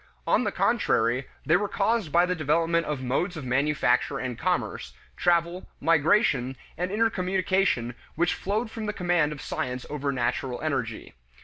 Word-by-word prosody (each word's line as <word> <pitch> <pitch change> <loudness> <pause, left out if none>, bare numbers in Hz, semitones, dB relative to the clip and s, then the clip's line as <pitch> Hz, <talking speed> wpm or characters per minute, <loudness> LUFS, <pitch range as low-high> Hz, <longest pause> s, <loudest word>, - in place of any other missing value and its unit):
On - - +2
the - - 0
contrary, 120 +4 +1 0.2
they - - +5
were 205 - -1
caused 205 -4 0
by 175 +3 +5
the 180 - 0
development 165 +1 +1
of 145 -3 -3
modes 160 +8 -1
of 145 - -6
manufacture 140 +2 +1
and 125 -2 -3
commerce, 115 - -2 0.2
travel, 175 +1 +1
migration, 150 - +3 0.2
and 180 +3 -2
intercommunication 190 - +1 0.2
which 175 +2 +2
flowed 220 +4 -2
from 220 -2 -5
the 210 - -1
command 175 -5 +1
of 150 - -7
science 125 0 -3
over 145 -1 -1
natural 125 0 -2
energy. 130 -8 -3
160 Hz, 150 wpm, -26 LUFS, 130-185 Hz, 0.2 s, they